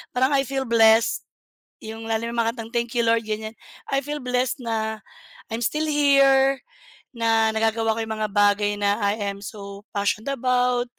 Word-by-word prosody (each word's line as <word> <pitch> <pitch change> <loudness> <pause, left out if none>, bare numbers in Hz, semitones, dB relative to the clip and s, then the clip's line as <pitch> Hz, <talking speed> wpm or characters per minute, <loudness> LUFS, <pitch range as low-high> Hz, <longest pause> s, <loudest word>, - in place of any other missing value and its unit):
Parang 260 +3 +2
I 275 -2 +1
feel 270 +1 -2
blessed, 225 -2 +4 0.6
yung 225 +1 -8
lalo 225 +1 -1
na 235 - -5
mga 230 -1 +1
kantang 225 -1 -8
Thank 235 0 -2
you 235 - +3
Lord, 230 0 +3
ganiyan. 215 0 -4 0.4
I 275 - +2
feel 295 0 -4
blessed 250 +1 -1
na 220 -2 -2 0.5
I'm 225 - -2
still 305 +6 0
here, 275 -2 +4 0.6
na 225 -1 +2
nagagawa 225 0 +1
ko - - -3
yung 220 0 -4
mga 215 0 -1
bagay 205 0 +3
na 200 0 +1
I 200 +1 +1
am 200 - -8
so 200 -1 -9
passioned 205 +4 -1
about. 250 -1 +1
230 Hz, 175 wpm, -23 LUFS, 220-250 Hz, 0.6 s, blessed